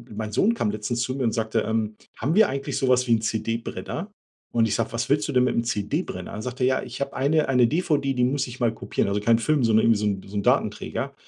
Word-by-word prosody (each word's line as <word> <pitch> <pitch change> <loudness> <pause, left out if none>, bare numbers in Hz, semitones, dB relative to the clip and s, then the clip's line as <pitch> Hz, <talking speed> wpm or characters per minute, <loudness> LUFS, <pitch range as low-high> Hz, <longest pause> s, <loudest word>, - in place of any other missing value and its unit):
mein 110 0 -4
Sohn 215 - +3
kam 165 - -1
letztens 110 +3 -2
zu 130 +1 -1
mir 135 - -2
und 115 - +1
sagte: 110 0 0
„Ähm, 110 -1 -1 0.2
haben 145 +9 -1
wir 220 - +6
eigentlich 140 +1 -3
sowas 125 -2 +3
wie 120 - 0
'n 110 - -2
CD-Brenner?“ 115 - -3 0.4
Und 115 -1 +3
ich - - 0
sage: 115 0 -2
„Was 115 - -2
willst 145 +2 +2
du 145 - -3
denn 125 -1 +4
mit - - +1
'nem 115 - +1
CD-Brenner?“ 105 - -3
Dann 105 - -6
sagte 125 +1 -4
er: 125 - +4
„Ja, - - -8
ich - - -8
habe 140 - -2
eine 150 +3 +2
eine 125 -3 +4
DVD, 145 -4 0
die 125 -1 +1
muss 135 +2 0
ich 125 0 -9
mal 115 -1 +2
kopieren“. 100 -1 -2
Also 100 +1 0
keinen 115 +2 +3
Film, 145 +3 +1
sondern 110 0 +4
irgendwie 115 -2 +4
so 105 - -1
'n 95 -2 -2
so 100 +1 -6
'n - - +1
Datenträger. - - 0
120 Hz, 265 wpm, -24 LUFS, 110-135 Hz, 0.4 s, wir